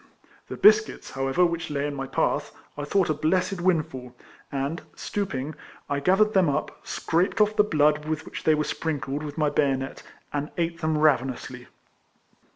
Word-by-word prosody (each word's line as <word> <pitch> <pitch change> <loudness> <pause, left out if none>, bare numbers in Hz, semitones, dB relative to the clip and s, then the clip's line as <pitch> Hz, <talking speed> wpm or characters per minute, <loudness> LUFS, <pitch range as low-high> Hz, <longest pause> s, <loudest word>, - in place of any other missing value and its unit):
The - - -5
biscuits, 215 +1 +4
however, 135 +6 +2
which 170 0 -2
lay 145 -1 -1
in 145 - -2
my 135 -1 -4
path, 130 - 0 0.2
I 145 - -4
thought 185 +1 +2
a - - +2
blessed 180 +5 0
windfall, 145 -9 -1 0.4
and, 140 +4 -2
stooping, 155 -8 -3 0.4
I 140 - +1
gathered 195 +8 +3
them 185 -5 +4
up, 145 +2 -2
scraped 175 +6 0
off 210 0 +3
the 210 - +5
blood 150 -5 +2
with 155 0 -3
which - - -7
they 155 - +4
were 150 - 0
sprinkled 145 -3 -3
with 150 0 -7
my 150 -2 +2
bayonet, 135 -2 0 0.3
and 145 +1 -2
ate 170 0 -1
them 155 -1 +1
ravenously. 135 -4 0
155 Hz, 165 wpm, -26 LUFS, 140-175 Hz, 0.4 s, the